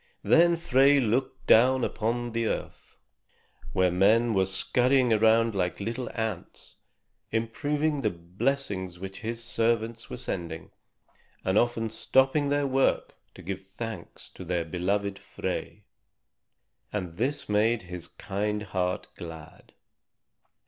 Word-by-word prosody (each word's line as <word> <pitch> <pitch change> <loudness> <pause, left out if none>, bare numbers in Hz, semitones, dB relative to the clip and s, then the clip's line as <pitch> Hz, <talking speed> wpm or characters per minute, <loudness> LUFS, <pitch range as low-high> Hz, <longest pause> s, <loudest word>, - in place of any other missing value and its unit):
Then 170 +1 +5
Frey 140 -3 +4
looked 130 +2 -1
down 130 +3 +5
upon 120 +2 -1
the 115 0 0
earth, - - -5 0.7
where 90 -1 +2
men 110 +6 +4
were 95 -2 +2
scurrying 125 +5 +2
around 110 +1 +4
like 90 -3 -1
little 115 +4 -3
ants, 110 -5 -5 0.5
improving 145 +6 0
the 110 - +2
blessings 95 +1 -2
which 95 +2 -7
his 115 +1 -4
servants 115 0 -1
were - - -5
sending, 85 -8 -5 0.7
and 95 - +1
often 115 -1 +1
stopping 135 +5 +2
their 145 0 +1
work 135 0 +1 0.2
to - - -12
give 95 +1 -4
thanks 95 -1 -8
to - - -10
their 85 -1 -1
beloved 100 +4 -1
Frey. - - -5 1.1
And 90 -5 -4
this 140 +6 -1
made 110 +1 +2
his 90 -1 -7
kind 105 +1 -3
heart 90 -2 -2
glad. 80 -2 -10
110 Hz, 120 wpm, -27 LUFS, 95-125 Hz, 1.1 s, Then